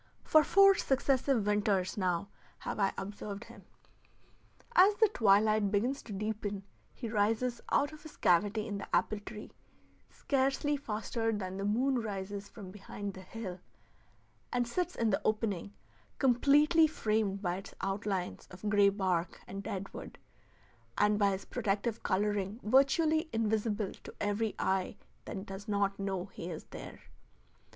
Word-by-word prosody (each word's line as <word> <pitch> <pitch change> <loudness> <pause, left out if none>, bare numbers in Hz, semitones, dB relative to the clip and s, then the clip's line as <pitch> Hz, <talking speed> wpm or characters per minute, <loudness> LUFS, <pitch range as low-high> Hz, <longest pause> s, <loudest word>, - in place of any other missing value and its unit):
For 310 -1 +5
four 395 +5 +7
successive 270 - +1
winters 205 -2 +1
now 185 -1 -1 0.3
have - - -5
I 195 -1 +3
observed 205 +1 -6
him. - - -14 1.1
As 400 +1 +7
the 440 +1 +5
twilight 215 - +4
begins 235 +7 0
to - - -11
deepen 205 -1 -3 0.3
he 235 - -6
rises 225 +3 0
out 290 +2 +2
of 305 - -11
his 315 0 -12
cavity 205 +5 +2
in 205 -3 -4
the - - -2
apple 215 - +1
tree, 210 +1 -9 0.6
scarcely 275 +1 0
faster 225 -3 -2
than 190 -3 -4
the 195 - -3
moon 250 +5 +2
rises 200 -1 -5
from 195 -4 -10
behind 205 0 -6
the 190 - -10
hill, 185 -1 -7 0.9
and 245 -1 0
sits 360 +8 -2
in 230 -2 +1
the 195 - +1
opening, 210 - -1 0.5
completely 295 +5 +5
framed 215 -8 -1
by 175 0 0
its 195 - -10
outlines 195 -1 -2
of 185 +3 -7
gray 205 -1 +5
bark 185 -3 -1
and 195 +1 -6
dead 195 -2 -5
wood, - - -9 0.8
and 210 0 +3
by 200 -1 +4
his 195 0 -3
protective 220 0 -1
coloring 205 +1 0
virtually 310 +7 +3
invisible 215 -2 0
to - - -10
every 205 +1 -1
eye 190 -1 0 0.3
that 195 0 -6
does 195 +2 -8
not 200 -1 0
know 195 -2 -2
he 180 -3 -8
is 160 - -6
there. - - -9
210 Hz, 145 wpm, -32 LUFS, 195-240 Hz, 1.1 s, four